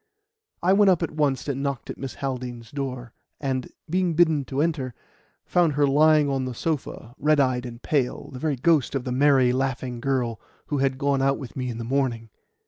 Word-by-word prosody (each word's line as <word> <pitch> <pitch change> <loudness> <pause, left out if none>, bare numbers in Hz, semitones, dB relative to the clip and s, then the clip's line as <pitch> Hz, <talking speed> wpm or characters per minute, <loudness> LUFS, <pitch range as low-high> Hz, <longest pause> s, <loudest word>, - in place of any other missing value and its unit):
I 185 +2 +4
went 200 0 +5
up 180 -2 +3
at 165 - -2
once 145 -4 0
and 140 -1 -2
knocked 140 -2 -3
at - - -9
Miss 135 -2 -5
Haldean's 125 -4 -5
door, 130 -4 -5 0.3
and, 130 -3 -2 0.2
being 175 0 0
bidden 160 -4 +4
to 135 +1 -4
enter, 145 -6 -1 0.5
found 175 -4 +2
her 145 +1 +3
lying 150 +1 +4
on 135 -2 -1
the 125 -1 -5
sofa, 135 -5 -3
red 150 0 +3
eyed 130 -2 +1
and 115 0 -10
pale, 135 -5 -1
the 130 - -8
very 150 0 0
ghost 145 0 +2
of 135 - -1
the 125 - -4
merry, 130 -1 +4
laughing 130 -2 -2
girl 125 -4 -1 0.3
who 145 -2 -2
had 135 -1 +1
gone 140 0 +1
out 135 0 +2
with 130 -5 -9
me 130 -1 -3
in 115 - -5
the 115 - -4
morning. 120 -3 -1
135 Hz, 205 wpm, -25 LUFS, 125-150 Hz, 0.5 s, went